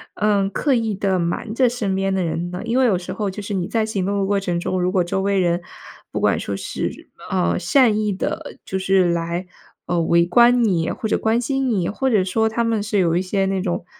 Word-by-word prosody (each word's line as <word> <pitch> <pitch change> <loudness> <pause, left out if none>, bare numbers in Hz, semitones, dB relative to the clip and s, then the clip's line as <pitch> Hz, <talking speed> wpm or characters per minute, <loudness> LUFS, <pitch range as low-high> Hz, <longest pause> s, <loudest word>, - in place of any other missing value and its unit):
嗯， 205 -2 +1
刻 275 +7 0
意 225 -4 0
地 190 -1 0
瞒 175 +5 -2
着 250 +1 +3
身 220 -5 -2
边 195 0 0
的 190 -1 0
人 170 +1 -2
呢？ 180 +1 -6
因 235 +3 +1
为 260 - +4
有 205 -7 +3
时 175 - -6
候 210 -2 -2
就 195 +2 -6
是 205 - -5
你 180 -3 -1
在 225 -2 0
行 200 -4 -2
动 200 +1 -1
的 195 - +1
过 200 0 +1
程 180 -3 -2
中， 180 +1 -2
如 180 - +1
果 185 -1 +2
周 175 +2 -2
围 200 0 +1
人 175 -1 +1 0.5
不 - - -2
管 - - +2
说 100 - -4
是， - - -5 0.2
呃， 85 0 +1
善 240 -6 +3
意 210 -1 0
地， 190 - -4
就 190 - -3
是， 190 -2 +3
来， 170 +2 -2 0.4
呃， 175 -1 0
围 170 +1 +3
观 240 +6 +5
你 175 -7 +1
或 220 - -3
者 - - +1
关 225 +1 +1
心 270 +1 -1
你， 190 -7 0
或 265 +6 -1
者 210 -6 +3
说 220 +4 +1
他 235 +2 -1
们 225 -2 0
是 210 0 -1
有 170 -3 +2
一 175 - +2
些 195 +1 0
那 190 -1 -1
种 175 -2 -2
195 Hz, 265 characters per minute, -21 LUFS, 180-220 Hz, 0.5 s, 观